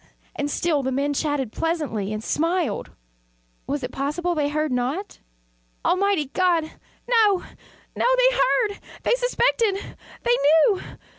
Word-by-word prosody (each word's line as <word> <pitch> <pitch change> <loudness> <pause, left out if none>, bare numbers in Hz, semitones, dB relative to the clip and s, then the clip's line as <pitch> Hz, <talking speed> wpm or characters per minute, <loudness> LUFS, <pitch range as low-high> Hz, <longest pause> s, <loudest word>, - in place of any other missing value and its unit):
And 290 0 -2
still 305 -1 0
the 265 0 -2
men 280 +2 0
chatted 285 -5 -1
pleasantly, 300 - -2
and 215 0 -4
smiled. 330 - -1 0.8
Was 280 -1 -2
it 250 - -4
possible 300 +7 -1
they 295 -3 0
heard 305 0 -1
not? 260 +11 -2 0.7
Almighty 385 -4 +2
God! 355 -3 +2 0.4
no, 435 -6 +3 0.5
no! - - 0
They - - +4 0.4
heard! - - -18 0.2
they - - +3
suspected! 485 -4 +2 0.5
they 485 0 +3 0.3
knew! 385 - -2
320 Hz, 130 wpm, -23 LUFS, 280-390 Hz, 0.8 s, They